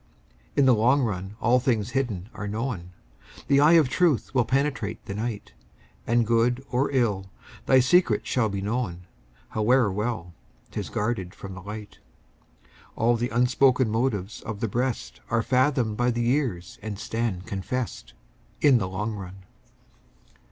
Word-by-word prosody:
In 140 Hz, -, +4 dB
the 130 Hz, -, +6 dB
long 125 Hz, +5 st, +3 dB
run 100 Hz, -2 st, -3 dB
all 125 Hz, +2 st, +3 dB
hidden 120 Hz, -5 st, +1 dB
things 115 Hz, -7 st, -2 dB
are 105 Hz, -1 st, -5 dB
known, 105 Hz, -4 st, -3 dB, 0.6 s
The 140 Hz, -, +4 dB
eye 150 Hz, +3 st, +6 dB
of 160 Hz, -5 st, +6 dB
truth 150 Hz, -1 st, +1 dB
will 125 Hz, -3 st, +3 dB
penetrate 130 Hz, -6 st, -1 dB
the 100 Hz, -, -5 dB
night, 110 Hz, 0 st, -4 dB, 0.5 s
And 120 Hz, 0 st, +3 dB
good 120 Hz, +3 st, +1 dB
or 130 Hz, +2 st, +1 dB
ill, 105 Hz, -8 st, 0 dB, 0.4 s
thy 130 Hz, -1 st, +6 dB
secret 130 Hz, -, +3 dB
shall 120 Hz, -4 st, +1 dB
be 100 Hz, -1 st, -3 dB
known, 100 Hz, -6 st, -3 dB, 0.4 s
However 110 Hz, 0 st, +3 dB
well 100 Hz, -4 st, -3 dB, 0.4 s
'tis -, -, -4 dB
guarded 105 Hz, -4 st, -2 dB
from 95 Hz, -1 st, -8 dB
the 95 Hz, -, -9 dB
light. 105 Hz, +1 st, -8 dB, 1.0 s
All 120 Hz, +2 st, +3 dB
the 120 Hz, +1 st, -1 dB
unspoken 125 Hz, +1 st, +3 dB
motives 110 Hz, -4 st, -1 dB
of 105 Hz, -2 st, -6 dB
the 115 Hz, -, -1 dB
breast 125 Hz, +4 st, -3 dB
Are 115 Hz, -1 st, +1 dB
fathomed 130 Hz, -4 st, +1 dB
by 120 Hz, 0 st, +2 dB
the 120 Hz, 0 st, -1 dB
years 120 Hz, -, -1 dB
and 105 Hz, -1 st, -5 dB
stand 110 Hz, -5 st, -3 dB
confess'd 100 Hz, -, -4 dB, 0.5 s
In 140 Hz, -5 st, +5 dB
the 95 Hz, -, -2 dB
long 105 Hz, +4 st, -3 dB
run. 95 Hz, -2 st, -9 dB
115 Hz, 150 wpm, -26 LUFS, 100-125 Hz, 1.0 s, the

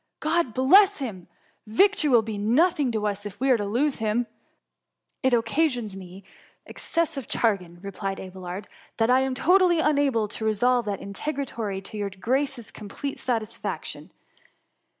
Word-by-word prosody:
God 310 Hz, -6 st, 0 dB
bless 380 Hz, +10 st, +6 dB
him! 210 Hz, -, -6 dB, 0.4 s
victory 310 Hz, -, +3 dB
will 240 Hz, -4 st, +5 dB
be 220 Hz, -1 st, -5 dB
nothing 275 Hz, -, +2 dB
to 215 Hz, -2 st, -2 dB
us, 205 Hz, -1 st, -2 dB
if 200 Hz, -, -12 dB
we 265 Hz, +1 st, +2 dB
are 250 Hz, -, +5 dB
to 205 Hz, -2 st, -3 dB
lose 265 Hz, +7 st, 0 dB
him.^ 220 Hz, +2 st, +1 dB
^^ -, -, -33 dB, 0.9 s
It 260 Hz, -, +2 dB
occasions 240 Hz, -2 st, +1 dB
me 190 Hz, 0 st, -10 dB, 0.4 s
excessive 310 Hz, -6 st, -3 dB
chagrin/' 180 Hz, -6 st, -1 dB
replied 195 Hz, 0 st, -4 dB
Abelard, 185 Hz, +1 st, -7 dB, 0.3 s
^^ -, -, -49 dB
that 225 Hz, +2 st, +2 dB
I 255 Hz, -, +5 dB
am 265 Hz, -1 st, -1 dB
totally 360 Hz, +3 st, +4 dB
unable 280 Hz, -8 st, +2 dB
to 225 Hz, -, -5 dB
resolve 240 Hz, +3 st, +2 dB
that 200 Hz, -2 st, -3 dB
interrogatory 220 Hz, -3 st, -4 dB
to 195 Hz, +2 st, -8 dB
your 205 Hz, -1 st, -2 dB
grace^s 245 Hz, +5 st, -2 dB
complete 225 Hz, +7 st, -6 dB
sa 250 Hz, -, 0 dB
56 220 Hz, +1 st, -7 dB
THE -, -, -4 dB
MUMMY. -, -, -1 dB
tisfaction. -, -, -9 dB
230 Hz, 170 wpm, -25 LUFS, 205-280 Hz, 0.9 s, bless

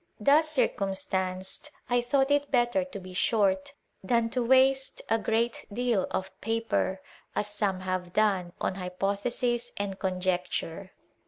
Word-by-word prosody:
Thus 295 Hz, +8 st, +5 dB
circumstanced, 190 Hz, -4 st, -1 dB, 0.2 s
I 245 Hz, 0 st, +2 dB
thought 270 Hz, +3 st, +1 dB
it 285 Hz, 0 st, +2 dB
better 245 Hz, +2 st, +2 dB
to 275 Hz, -7 st, -8 dB
be 185 Hz, 0 st, -10 dB
short 215 Hz, +8 st, +1 dB, 0.3 s
than 230 Hz, +3 st, +1 dB
to 250 Hz, 0 st, 0 dB
waste 265 Hz, +2 st, +3 dB
a 225 Hz, -, +3 dB
great 230 Hz, +2 st, 0 dB
deal 235 Hz, -3 st, +1 dB
of 190 Hz, +1 st, -3 dB
paper, 225 Hz, -4 st, -1 dB, 0.3 s
as -, -, +1 dB
some 205 Hz, -2 st, -1 dB
have 185 Hz, -1 st, -3 dB
done, 190 Hz, -4 st, +1 dB
in -, -, +1 dB
hypothesis 200 Hz, +6 st, -1 dB
and 200 Hz, -1 st, -3 dB
conjecture. 185 Hz, -1 st, -2 dB
210 Hz, 135 wpm, -28 LUFS, 190-245 Hz, 0.3 s, Thus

